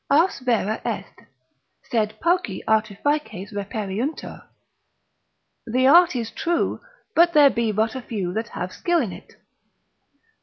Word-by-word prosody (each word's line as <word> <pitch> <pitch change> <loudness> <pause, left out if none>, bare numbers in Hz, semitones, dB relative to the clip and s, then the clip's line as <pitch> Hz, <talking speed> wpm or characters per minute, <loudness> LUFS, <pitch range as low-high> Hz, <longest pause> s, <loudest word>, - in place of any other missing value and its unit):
Ars 325 +7 +3
vera 230 -4 0
est, - - -6 0.6
sed 215 -3 -1
pauci 340 - 0
artifices 220 0 -1
reperiuntur; 205 +6 -4 1.2
the 255 +3 +1
art 335 +3 +6
is 230 -2 -3
true, 340 0 -1 0.3
but 340 +1 +4
there 290 -2 +7
be 230 -2 0
but 220 +2 0
a 260 - -5
few 195 -7 -4
that 225 +3 -2
have 180 -4 -6
skill 345 -1 +1
in 230 - -2
it. - - -12
230 Hz, 125 wpm, -23 LUFS, 210-295 Hz, 1.2 s, there